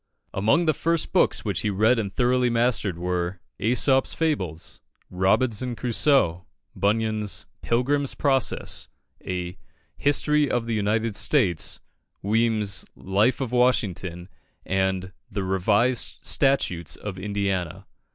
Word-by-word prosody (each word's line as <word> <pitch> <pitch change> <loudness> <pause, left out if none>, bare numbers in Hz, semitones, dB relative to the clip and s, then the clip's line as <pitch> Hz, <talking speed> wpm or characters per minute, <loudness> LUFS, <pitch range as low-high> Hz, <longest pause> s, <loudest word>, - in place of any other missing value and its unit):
Among 110 - +2
the 155 - +3
first 165 +3 -1
books - - +2
which - - -1
he 105 - -1
read 110 +5 +3
and 100 -3 -3
thoroughly 125 +3 +2
mastered 115 -6 +1
were 90 +1 -2 0.2
"Æsop's 125 +5 +2
Fables," 95 - -2 0.3
"Robinson 110 +6 +1
Crusoe," 115 - +1 0.3
Bunyan's 110 0 -1 0.2
"Pilgrim's 140 +4 0
Progress," 135 -3 0 0.3
a 90 0 -4 0.4
"History 150 0 +2
of 120 -1 0
the 115 - -2
United 110 +1 0
States," 100 - +1 0.4
Weem's 110 -1 +1
"Life 105 +8 +1
of 130 -3 -3
Washington," 100 -8 0 0.4
and 95 -1 -1 0.2
"The 100 -2 -3
Revised 100 +6 +1
Statutes 115 - +2
of 100 -3 -7
Indiana." 100 -4 -2
110 Hz, 110 wpm, -24 LUFS, 95-125 Hz, 0.4 s, the